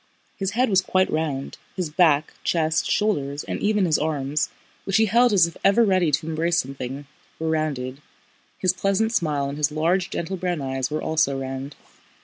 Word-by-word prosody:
His 195 Hz, +1 st, -3 dB
head 255 Hz, +1 st, +4 dB
was 190 Hz, -3 st, +3 dB
quite 185 Hz, 0 st, +1 dB
round, 150 Hz, -4 st, -2 dB, 0.2 s
his 180 Hz, -5 st, -3 dB
back, 155 Hz, -3 st, +3 dB
chest, 160 Hz, -2 st, +1 dB
shoulders, 145 Hz, -9 st, 0 dB
and -, -, -4 dB
even 210 Hz, -2 st, +2 dB
his 160 Hz, -3 st, +2 dB
arms, 150 Hz, -1 st, -1 dB, 0.3 s
which 195 Hz, +1 st, +1 dB
he 220 Hz, -, +4 dB
held 235 Hz, +3 st, +4 dB
as 190 Hz, -5 st, +5 dB
if 170 Hz, -, -6 dB
ever 225 Hz, +4 st, +5 dB
ready 185 Hz, -5 st, +3 dB
to 155 Hz, +2 st, 0 dB
embrace 165 Hz, +1 st, 0 dB
something, 135 Hz, 0 st, -5 dB, 0.3 s
were 160 Hz, 0 st, -2 dB
rounded, 140 Hz, -4 st, -2 dB, 0.6 s
his 185 Hz, -1 st, +2 dB
pleasant 200 Hz, +4 st, 0 dB
smile 150 Hz, -7 st, 0 dB
and 140 Hz, +2 st, -5 dB
his 150 Hz, 0 st, +2 dB
large, 170 Hz, +4 st, +1 dB
gentle 185 Hz, +3 st, -3 dB
brown 180 Hz, -2 st, -2 dB
eyes 135 Hz, -1 st, -2 dB
were 155 Hz, +1 st, -3 dB
also 140 Hz, -4 st, +1 dB
round. 135 Hz, +1 st, -5 dB
160 Hz, 180 wpm, -23 LUFS, 145-185 Hz, 0.6 s, as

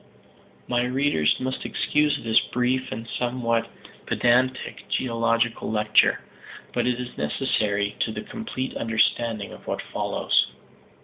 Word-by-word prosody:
My 120 Hz, 0 st, +1 dB
readers 125 Hz, -, +2 dB
must 130 Hz, 0 st, -3 dB
excuse 150 Hz, 0 st, +1 dB
this 115 Hz, -1 st, +5 dB
brief 125 Hz, +1 st, 0 dB
and 115 Hz, +1 st, -5 dB
somewhat 120 Hz, -1 st, -1 dB, 0.4 s
pedantic 125 Hz, +1 st, +1 dB
geological 115 Hz, -1 st, 0 dB
lecture. 105 Hz, -1 st, +3 dB, 0.5 s
But 120 Hz, 0 st, +1 dB
it 125 Hz, 0 st, 0 dB
is 125 Hz, -1 st, -6 dB
necessary 100 Hz, -, 0 dB
to 110 Hz, -, +1 dB
the 105 Hz, 0 st, -5 dB
complete 225 Hz, -, -5 dB
understanding 115 Hz, -1 st, +1 dB
of -, -, -14 dB
what -, -, -2 dB
follows. -, -, +2 dB
120 Hz, 120 wpm, -25 LUFS, 110-130 Hz, 0.5 s, this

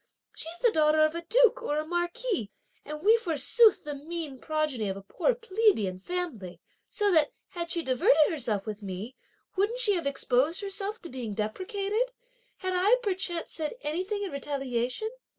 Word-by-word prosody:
She's 330 Hz, +2 st, -2 dB
the 475 Hz, -, +5 dB
daughter 310 Hz, -1 st, +4 dB
of 310 Hz, -, -1 dB
a 335 Hz, -, -4 dB
duke -, -, +5 dB
or 300 Hz, -11 st, -1 dB
a 305 Hz, -, -1 dB
marquis, 345 Hz, -, -2 dB, 0.3 s
and 300 Hz, +2 st, -7 dB
we 440 Hz, +3 st, +6 dB
forsooth 430 Hz, -, +4 dB
the 295 Hz, -, -4 dB
mean 300 Hz, -1 st, -6 dB
progeny 305 Hz, -9 st, -1 dB
of 190 Hz, -, -3 dB
a 195 Hz, -, -10 dB
poor -, -, 0 dB
plebeian 395 Hz, -, +1 dB
family; 255 Hz, -, -4 dB, 0.3 s
so 415 Hz, -2 st, +1 dB
that, 315 Hz, -4 st, +3 dB, 0.2 s
had 340 Hz, -2 st, -5 dB
she 340 Hz, -1 st, +1 dB
diverted 305 Hz, -, +4 dB
herself 230 Hz, -, 0 dB
with 215 Hz, -1 st, -5 dB
me, 200 Hz, +6 st, -6 dB, 0.4 s
wouldn't 410 Hz, +5 st, +1 dB
she 425 Hz, -5 st, +4 dB
have 340 Hz, -6 st, -1 dB
exposed 280 Hz, +4 st, +1 dB
herself 400 Hz, +2 st, -3 dB
to 345 Hz, -, -7 dB
being 240 Hz, -5 st, -5 dB
depreciated, 400 Hz, -, -2 dB, 0.4 s
had 370 Hz, -1 st, -2 dB
I, 390 Hz, +6 st, +5 dB
perchance, 370 Hz, -4 st, -2 dB
said 315 Hz, +5 st, -3 dB
anything 375 Hz, +7 st, -2 dB
in 390 Hz, -, -4 dB
retaliation? 275 Hz, -, -2 dB
330 Hz, 170 wpm, -28 LUFS, 265-405 Hz, 0.4 s, we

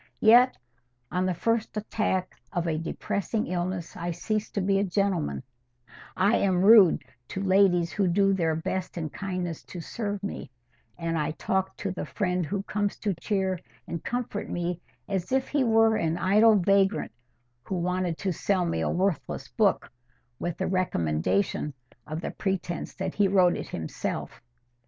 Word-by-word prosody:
Yet 240 Hz, +3 st, +6 dB, 0.5 s
on 180 Hz, +1 st, +1 dB
the 185 Hz, -, 0 dB
first 230 Hz, +2 st, 0 dB
attack 205 Hz, -3 st, -1 dB, 0.2 s
of 175 Hz, -3 st, -1 dB
a 160 Hz, -2 st, 0 dB
depressing 200 Hz, +6 st, -2 dB
illness 180 Hz, -1 st, -3 dB
I 170 Hz, +1 st, -4 dB
cease 210 Hz, +5 st, -2 dB
to -, -, 0 dB
be 195 Hz, +1 st, +2 dB
a -, -, +2 dB
gentleman, 195 Hz, -6 st, 0 dB, 0.7 s
I 200 Hz, +4 st, +4 dB
am 185 Hz, -2 st, +2 dB
rude 205 Hz, -7 st, +7 dB, 0.2 s
to 195 Hz, -, -4 dB
ladies 185 Hz, -3 st, +4 dB
who 200 Hz, -2 st, +1 dB
do 195 Hz, +2 st, +3 dB
their 165 Hz, -4 st, +1 dB
best 180 Hz, +3 st, -3 dB
and 155 Hz, -3 st, -4 dB
kindest 180 Hz, -4 st, -4 dB
to 180 Hz, -, -7 dB
serve 205 Hz, +3 st, -4 dB
me, 200 Hz, -, -5 dB, 0.5 s
and 165 Hz, -1 st, -1 dB
I 150 Hz, -, 0 dB
talk 190 Hz, +4 st, -2 dB
to 200 Hz, -, -3 dB
the 180 Hz, -, -5 dB
friend 180 Hz, -5 st, -1 dB
who 200 Hz, +4 st, -2 dB
comes 205 Hz, 0 st, -2 dB
to 205 Hz, -2 st, -1 dB
cheer 190 Hz, 0 st, -1 dB, 0.3 s
and 170 Hz, -, -5 dB
comfort 245 Hz, -4 st, -3 dB
me 175 Hz, 0 st, -2 dB, 0.3 s
as 190 Hz, -1 st, -2 dB
if 265 Hz, 0 st, +1 dB
he 285 Hz, -2 st, +2 dB
were 225 Hz, -1 st, +4 dB
an 165 Hz, 0 st, 0 dB
idle 215 Hz, +4 st, +5 dB
vagrant 195 Hz, +2 st, +2 dB, 0.5 s
who 190 Hz, -, -4 dB
wanted 180 Hz, -1 st, -1 dB
to 190 Hz, -3 st, -1 dB
sell 185 Hz, +2 st, +1 dB
me 80 Hz, -, -1 dB
a -, -, 0 dB
worthless 185 Hz, -2 st, -1 dB
book -, -, +1 dB, 0.5 s
with 175 Hz, -2 st, -3 dB
the -, -, -1 dB
recommendation 95 Hz, -, 0 dB, 0.3 s
of 155 Hz, +2 st, -4 dB
the -, -, -4 dB
pretence 190 Hz, -3 st, -3 dB
that 190 Hz, -1 st, -3 dB
he 205 Hz, -1 st, +3 dB
wrote 185 Hz, -2 st, +4 dB
it -, -, -5 dB
himself. 80 Hz, +7 st, -4 dB
185 Hz, 165 wpm, -27 LUFS, 175-200 Hz, 0.7 s, rude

